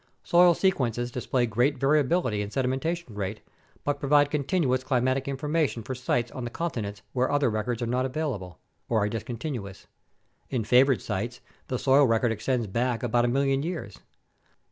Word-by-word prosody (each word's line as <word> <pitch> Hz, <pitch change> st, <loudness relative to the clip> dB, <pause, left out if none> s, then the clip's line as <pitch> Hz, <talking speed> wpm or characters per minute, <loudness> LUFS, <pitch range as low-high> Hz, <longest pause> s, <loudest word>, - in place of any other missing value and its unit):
Soil 175 Hz, 0 st, +5 dB
sequences 125 Hz, -, 0 dB
display 125 Hz, 0 st, 0 dB
great 120 Hz, +6 st, +1 dB
variability 140 Hz, -3 st, +2 dB
in 100 Hz, -, -4 dB
sedimentation 135 Hz, +4 st, -2 dB
rate 100 Hz, -2 st, -3 dB, 0.4 s
but 145 Hz, -1 st, -1 dB
provide 145 Hz, 0 st, +3 dB
continuous 140 Hz, -3 st, +1 dB
climatic 130 Hz, +1 st, 0 dB
information 145 Hz, -2 st, -1 dB
for 130 Hz, -, -4 dB
sites 120 Hz, -1 st, -1 dB
on 130 Hz, -, -6 dB
the 120 Hz, -, -3 dB
continents 110 Hz, -9 st, -4 dB
where 130 Hz, +2 st, +1 dB
other 145 Hz, -4 st, +2 dB
records 110 Hz, +2 st, -2 dB
are -, -, 0 dB
not 125 Hz, +2 st, 0 dB
available 125 Hz, -, -4 dB, 0.3 s
(or 115 Hz, -, +2 dB
are 105 Hz, -, 0 dB
discontinuous); 115 Hz, -2 st, -5 dB, 0.6 s
in 125 Hz, -4 st, -1 dB
favored 125 Hz, +4 st, +4 dB
sites, 115 Hz, +4 st, -3 dB, 0.3 s
the 125 Hz, -, -2 dB
soil 135 Hz, +3 st, +5 dB
record 115 Hz, +1 st, +2 dB
extends 115 Hz, +2 st, -1 dB
back 115 Hz, +4 st, -1 dB
about 120 Hz, 0 st, +2 dB
a -, -, +2 dB
million 135 Hz, +2 st, +1 dB
years. 170 Hz, +1 st, -5 dB
125 Hz, 160 wpm, -27 LUFS, 115-140 Hz, 0.6 s, Soil